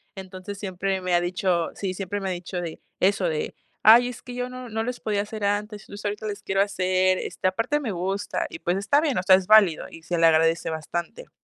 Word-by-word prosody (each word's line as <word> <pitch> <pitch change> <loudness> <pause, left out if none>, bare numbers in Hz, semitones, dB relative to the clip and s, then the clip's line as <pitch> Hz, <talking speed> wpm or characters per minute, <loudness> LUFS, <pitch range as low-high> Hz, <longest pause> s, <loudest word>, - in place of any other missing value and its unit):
Entonces 190 +1 -8
siempre 190 0 -2
me 180 -1 -1
ha 175 - +4
dicho, 175 -1 0
sí, 190 -2 -3
siempre 195 +2 -4
me 195 -1 -3
ha - - -1
dicho 180 0 -5
de 165 -2 -6 0.2
eso, 195 0 +2
de: 155 -1 -3 0.3
"Ay, 240 +3 +8
es 245 - -9
que 250 - -9
yo 250 0 -3
no 255 0 -8
no 225 +1 -2
les 250 +1 -4
podía 205 -2 -1
hacer 210 0 -5
antes, 205 0 -2
entonces 205 +1 -10
ahorita 210 +1 -3
les 205 0 -5
quiero 195 0 +1
hacer, 185 -1 +2
este, - - -2
aparte 230 +10 0
me 240 -7 -3
gusta". 190 +3 -2
Y, 165 - -8
pues 175 +2 0
está 280 +9 +2
bien, 295 -5 0
o 180 - 0
sea, 185 0 +7
es 185 -1 -1
válido 210 -7 +5
y 165 - -13
se 175 +1 -2
le 165 - +5
agradece 165 +1 +3
bastante. 170 - -5
195 Hz, 235 wpm, -25 LUFS, 180-215 Hz, 0.3 s, Ay